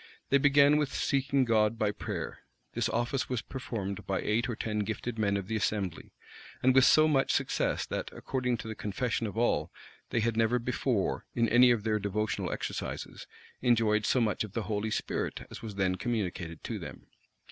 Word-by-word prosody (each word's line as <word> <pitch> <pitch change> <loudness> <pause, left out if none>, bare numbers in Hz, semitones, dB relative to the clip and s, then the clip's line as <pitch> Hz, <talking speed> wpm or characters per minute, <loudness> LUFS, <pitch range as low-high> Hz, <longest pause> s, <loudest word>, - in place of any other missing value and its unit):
They 140 - +5
began 145 +1 +5
with 150 -2 0
seeking 140 -1 +1
God 110 -1 +2
by 105 -2 +1
prayer: - - -5 0.3
this - - 0
office 120 +3 -1
was 125 -4 -2
performed 105 -7 -5
by 95 - 0
eight 115 +4 0
or 120 - -2
ten 105 -1 -2
gifted 110 +2 -3
men 100 -2 +2
of 100 - -4
the 110 +3 -3
assembly; 100 -4 -2 0.5
and 130 0 +5
with 130 0 +6
so 155 0 +6
much 135 -3 +2
success, - - 0
that, - - -4
according 125 -2 -2
to 110 - -8
the 110 - -4
confession 110 +2 -2
of 105 - -7
all, 120 +1 +1 0.4
they 120 - 0
had 115 0 0
never 115 +2 +3
before, 125 -3 -1
in 115 -1 +3
any 125 +2 +7
of 120 -4 +2
their 110 -1 +1
devotional 105 +2 -2
exercises, - - -5 0.3
enjoyed 110 -3 +3
so 130 - +3
much 110 -3 +1
of 105 -3 -8
the 115 - -2
Holy 105 +2 -2
Spirit - - -3
as - - -8
was 110 -3 -7
then 95 -2 +1
communicated 90 -7 -3
to - - -4
them. - - -9
115 Hz, 190 wpm, -30 LUFS, 105-125 Hz, 0.5 s, any